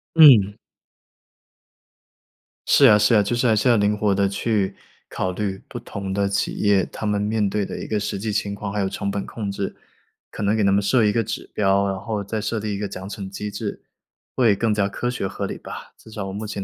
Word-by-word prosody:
嗯。 125 -11 +8 2.1
是 140 - +6
呀， 105 -5 +8
是 105 +3 +3
呀， 105 - +6
就 100 +4 -1
是 120 - 0
还 115 -2 +4
是 110 +4 +1
要 120 - +6
灵 105 0 +2
活 105 -2 +1
地 100 0 +2
去 100 -1 -1 0.3
考 95 - -2
虑 95 0 -3
不 - - -7
同 100 -1 -6
的 100 0 0
企 100 - -1
业， 100 -3 +3
他 - - -7
们 105 -1 0
面 105 0 0
对 105 0 -1
的 - - -6
一 - - -6
个 105 - -1
实 100 -1 -3
际 105 +2 -3
情 100 -1 -2
况， 100 0 -5
还 105 - -2
有 95 - +1
成 100 +1 -3
本 100 0 -3
控 105 -3 -5
制。 100 0 -4 0.6
可 - - -7
能 105 +1 +2
给 110 - +2
他 100 - +3
们 100 +1 +3
设 110 +3 +3
一 105 - +3
个 115 +1 +1
指 - - -5
标， 100 -1 +2
然 95 -1 -2
后 105 -1 -3
再 110 +2 -3
设 110 +2 -2
立 105 -1 -3
一 100 - -4
个 105 - -2
奖 95 -1 -8
惩 100 -1 -6
机 105 +2 -5
制， 100 +1 -5 0.5
会 115 -5 +4
更 110 +2 +1
加 100 -2 +1
科 120 - -4
学 125 -5 -2
合 100 +1 -4
理 - - -5
吧， - - -9
至 - - -17
少 105 -2 -5
我 95 - -6
目 105 +2 -5
前 100 -2 -4
105 Hz, 260 characters per minute, -22 LUFS, 100-110 Hz, 2.1 s, 嗯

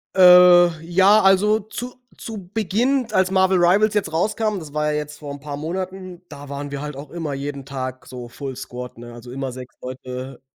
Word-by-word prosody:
Äh, 180 -2 +7
ja, 190 +5 +4
also 205 +3 +4
zu 240 +4 -7 0.2
zu 210 -5 -8
Beginn, 230 +5 0
d - - -13
als 185 0 +3
Marvel 190 0 +3
Rivals 205 +5 +4
jetzt 200 -6 -1
rauskam, 215 +5 0
das 155 -4 -11
war 150 0 0
ja - - 0
jetzt 150 0 -8
vor 145 -2 -7
'n 140 - -9
paar 145 -1 -6
Monaten, 185 +3 -6
da 145 -1 -10
waren 140 +1 -6
wir 140 -1 -5
halt 150 -1 -6
auch 140 +1 -9
immer 165 -4 -4
jeden 140 0 -5
Tag 130 -2 -6
so 125 -1 -9
Full 135 +1 -7
Squad, 125 0 -8
ne? 120 0 -10
Also 120 +1 -11
immer 135 0 -4
6 125 0 -10
Leute, 130 +1 -7
160 Hz, 205 wpm, -21 LUFS, 135-190 Hz, 0.2 s, Äh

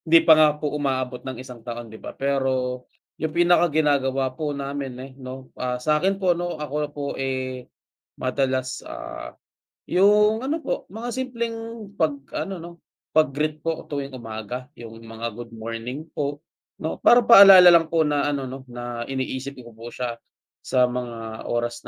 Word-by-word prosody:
'Di 165 0 +7
pa 160 - +9
nga 155 0 +7
po 150 -1 -3
umaabot 130 -4 -2
ng 130 -1 -6
isang 125 -2 -10
taon, 120 0 -6
'di 110 - -11
ba? - - -9
Pero 130 -2 -1 0.4
'yung 160 - 0
pinakaginagawa 145 -6 +3
po 150 +2 -3
namin, 140 -1 -4
eh, 130 +1 -8
'no, 130 0 -9
ah, 125 -1 -1
sa 150 +5 +1
akin 195 +1 +1
po 185 -2 +3
ano 175 -1 -3
ako 150 -1 -5
po, 145 0 -7 0.2
eh, 130 -1 -3 0.5
madalas, 130 0 -1
ah, 65 0 -8 0.5
'yung 210 +3 +5
ano 310 +4 -1
po - - -3
mga 230 +3 -5
simpleng 235 -2 -3 0.4
'pag 160 -3 +2 0.3
ano, 190 -3 -6
'no, 170 +1 -8 0.4
'pag-greet 155 0 +1
po 165 -1 -3
tuwing 140 -2 -4
umaga, 120 +1 -6
'yung 115 -1 -9
mga 115 0 -6
good 120 +1 -9
morning, 115 +5 -6
po, 145 -1 -2 0.4
'no? 160 - -4
Para 240 0 +6
paalala 195 -5 +10
lang 165 -1 +4
po 160 -1 +2
na 145 -1 +1
ano, 140 -2 -2
'no, 130 +1 -7
na 120 -1 -6
iniisip 135 +1 -4
ko 120 - -12
po 115 +2 -9
siya 120 0 -4 0.5
sa 125 -1 +3
mga 120 -3 -5
oras 120 0 -2
135 Hz, 165 wpm, -24 LUFS, 125-160 Hz, 0.5 s, paalala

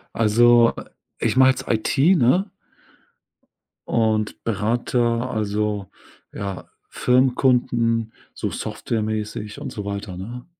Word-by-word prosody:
Also, 115 +2 +5
äh, - - -10 0.4
ich - - +1
mache 130 0 +7
jetzt 130 - -6
IT, 110 +4 -1 0.2
ne 180 - +2 1.4
und 110 -2 0
berate, 115 +3 0
also 105 -4 -1 0.4
ja, 100 -2 -6 0.2
Firmenkunden, 125 -3 +1 0.2
so - - -4
softwaremäßig 110 -1 -4
und - - -6
so 105 -1 -6
weiter, 100 -2 -5
ne? 120 +6 -8
115 Hz, 100 wpm, -22 LUFS, 105-120 Hz, 1.4 s, mache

